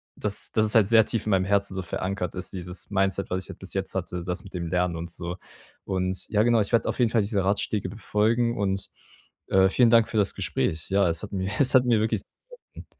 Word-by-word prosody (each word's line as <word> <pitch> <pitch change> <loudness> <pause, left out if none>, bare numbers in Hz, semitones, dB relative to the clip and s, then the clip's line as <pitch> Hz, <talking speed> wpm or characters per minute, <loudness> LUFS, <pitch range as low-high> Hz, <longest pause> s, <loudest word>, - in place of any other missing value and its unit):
dass 105 -1 0
dass 110 - +3
es 105 - +1
halt 105 -4 +6
sehr 110 -1 +6
tief 115 -1 -2
in - - -2
meinem 95 -1 +3
Herzen 100 -1 +1
so 95 - -2
verankert 95 0 -4
ist, 90 - -5
dieses 90 0 -7
Mindset, 95 0 0
was 90 - -1
ich - - -14
halt - - -10
bis - - -7
jetzt - - -2
hatte, 90 -1 -3
das 90 0 -4
mit 100 - -13
dem 85 -2 -4
Lernen 90 0 0
und 85 +1 -6
so. 85 0 -5 0.5
Und 95 -1 -2
ja 105 0 +2
genau, 120 -1 +3
ich 100 - -3
werde 115 - +3
auf - - -4
jeden 120 -2 +3
Fall 115 - +3
diese 100 -1 -1
Ratschläge 100 0 -1
befolgen 115 +3 0
und, 95 -1 -2 0.6
äh, 95 0 +4
vielen 120 +4 +4
Dank 115 -1 +5
für - - -2
das 100 -2 +1
Gespräch. 80 0 -2
Ja, 100 -1 +3
es 85 - -2
hat 105 - -7
mir 95 0 -2
es 135 -1 +3
hat 130 - +7
mir 115 -3 +3
wirklich 110 +1 0
sehr - - -26 0.4
geholfen. - - -11
100 Hz, 250 wpm, -25 LUFS, 90-110 Hz, 0.6 s, hat